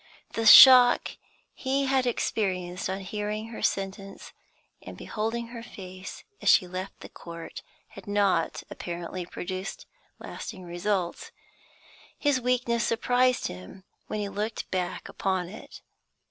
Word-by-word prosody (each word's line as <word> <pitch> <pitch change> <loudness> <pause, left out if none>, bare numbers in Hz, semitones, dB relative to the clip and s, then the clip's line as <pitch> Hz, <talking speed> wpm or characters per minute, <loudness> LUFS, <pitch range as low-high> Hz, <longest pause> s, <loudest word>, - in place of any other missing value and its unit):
The 225 -1 0
shock 250 +2 +9 0.4
he 275 +1 -1
had 265 -1 +1
experienced 185 -7 -2
on 190 +1 -3
hearing 210 +3 -4
her 230 - -8
sentence 195 0 -3 0.5
and - - -10
beholding 230 +2 -4
her 235 -1 -8
face 185 -4 -10 0.2
as - - +2
she - - +6
left 185 +2 -7
the - - -8
court 170 -1 -9 0.3
had - - -13
not, 205 -1 +1
apparently, 175 +1 -6
produced 185 +2 -6 0.3
lasting 190 -5 -8
results; 180 - -3 0.9
his 285 -4 +1
weakness 240 -1 0
surprised 250 +2 +1
him 90 - -8 0.2
when 215 - -3
he 205 - -2
looked 210 +2 -4
back 180 -2 -3
upon 185 -2 -2
it. 215 +4 -11
205 Hz, 125 wpm, -27 LUFS, 185-235 Hz, 0.9 s, shock